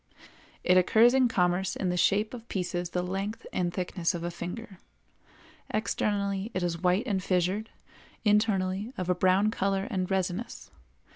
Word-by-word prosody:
It 180 Hz, -, +4 dB
occurs 220 Hz, +6 st, +5 dB
in 265 Hz, -1 st, +4 dB
commerce 180 Hz, -3 st, +1 dB
in 185 Hz, -, -1 dB
the 180 Hz, -, 0 dB
shape 205 Hz, +5 st, +2 dB
of 235 Hz, -1 st, -9 dB
pieces 175 Hz, -2 st, -2 dB
the 180 Hz, 0 st, -1 dB
length 195 Hz, +5 st, -4 dB
and 175 Hz, -1 st, 0 dB
thickness 180 Hz, 0 st, -1 dB
of 170 Hz, -, -5 dB
a 175 Hz, -, -2 dB
finger; 180 Hz, +3 st, -7 dB, 0.9 s
externally 200 Hz, -2 st, -1 dB
it 185 Hz, -, 0 dB
is 170 Hz, -1 st, -2 dB
white 185 Hz, +5 st, +2 dB
and 200 Hz, -6 st, 0 dB
fissured, 185 Hz, +4 st, 0 dB, 0.6 s
internally 210 Hz, 0 st, +1 dB
of 185 Hz, -1 st, -1 dB
a -, -, +5 dB
brown 185 Hz, +4 st, +3 dB
color 195 Hz, -2 st, 0 dB
and 185 Hz, -2 st, -1 dB
resinous. 190 Hz, +3 st, -3 dB
190 Hz, 155 wpm, -28 LUFS, 180-210 Hz, 0.9 s, occurs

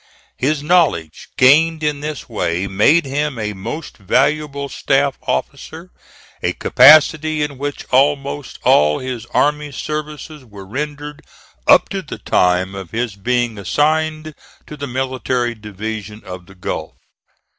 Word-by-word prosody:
His 145 Hz, +2 st, 0 dB
knowledge 150 Hz, -, +1 dB
gained 155 Hz, +5 st, +4 dB
in 150 Hz, -1 st, 0 dB
this 150 Hz, 0 st, -6 dB
way 90 Hz, -5 st, -2 dB
made 105 Hz, -, +3 dB
him 145 Hz, 0 st, -2 dB
a 105 Hz, -1 st, -3 dB
most 115 Hz, +11 st, -7 dB
valuable 140 Hz, +7 st, 0 dB
staff 135 Hz, 0 st, 0 dB
officer, 160 Hz, +5 st, -4 dB, 0.5 s
a -, -, 0 dB
capacity 155 Hz, +3 st, +5 dB
in 140 Hz, -3 st, -5 dB
which 145 Hz, 0 st, -4 dB
almost 140 Hz, +1 st, +1 dB
all 75 Hz, 0 st, +4 dB
his 125 Hz, -3 st, -6 dB
army 150 Hz, +3 st, 0 dB
services 150 Hz, 0 st, -6 dB
were 100 Hz, -5 st, -12 dB
rendered 145 Hz, +6 st, -6 dB, 0.5 s
up -, -, +6 dB
to -, -, -3 dB
the -, -, -8 dB
time 90 Hz, +1 st, +1 dB
of 95 Hz, -3 st, -8 dB
his 115 Hz, -2 st, -3 dB
being 120 Hz, +1 st, -1 dB
assigned 155 Hz, -, 0 dB, 0.3 s
to 150 Hz, -, -9 dB
the 145 Hz, -1 st, -6 dB
Military 130 Hz, -1 st, -2 dB
Division 105 Hz, 0 st, -7 dB
of 90 Hz, -1 st, -9 dB
the 95 Hz, -, -16 dB
Gulf. 90 Hz, -, -5 dB
135 Hz, 135 wpm, -18 LUFS, 105-150 Hz, 0.5 s, up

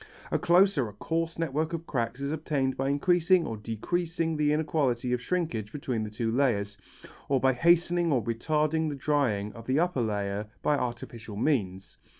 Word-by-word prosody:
A -, -, +1 dB
close 180 Hz, 0 st, +4 dB
or 120 Hz, -5 st, 0 dB
a -, -, -12 dB
coarse 165 Hz, +9 st, -2 dB
network 160 Hz, 0 st, -1 dB
of 165 Hz, 0 st, -4 dB
cracks 120 Hz, -2 st, -2 dB
is 140 Hz, +1 st, -2 dB
obtained 145 Hz, -4 st, -1 dB
by 135 Hz, +1 st, -1 dB
increasing 175 Hz, +4 st, +3 dB
or 115 Hz, -, -3 dB
decreasing 160 Hz, +10 st, -2 dB
the 150 Hz, -1 st, +2 dB
inequality 140 Hz, -6 st, 0 dB
of 125 Hz, -, -1 dB
shrinkage 125 Hz, -, -2 dB
between 130 Hz, -6 st, -3 dB
the 105 Hz, -, -4 dB
two 115 Hz, +2 st, -2 dB
layers, 110 Hz, -6 st, +1 dB, 0.5 s
or 135 Hz, -1 st, +3 dB
by 130 Hz, +1 st, +3 dB
hastening 170 Hz, +3 st, +3 dB
or 125 Hz, -5 st, +2 dB
retarding 155 Hz, +7 st, 0 dB
the 145 Hz, -, -4 dB
drying 130 Hz, -8 st, 0 dB
of 115 Hz, +2 st, -11 dB
the 130 Hz, +2 st, +2 dB
upper 175 Hz, -6 st, +1 dB
layer 105 Hz, -1 st, -2 dB, 0.2 s
by 150 Hz, -, +3 dB
artificial 120 Hz, -4 st, -5 dB
means. 100 Hz, -7 st, -1 dB
140 Hz, 175 wpm, -28 LUFS, 115-160 Hz, 0.5 s, close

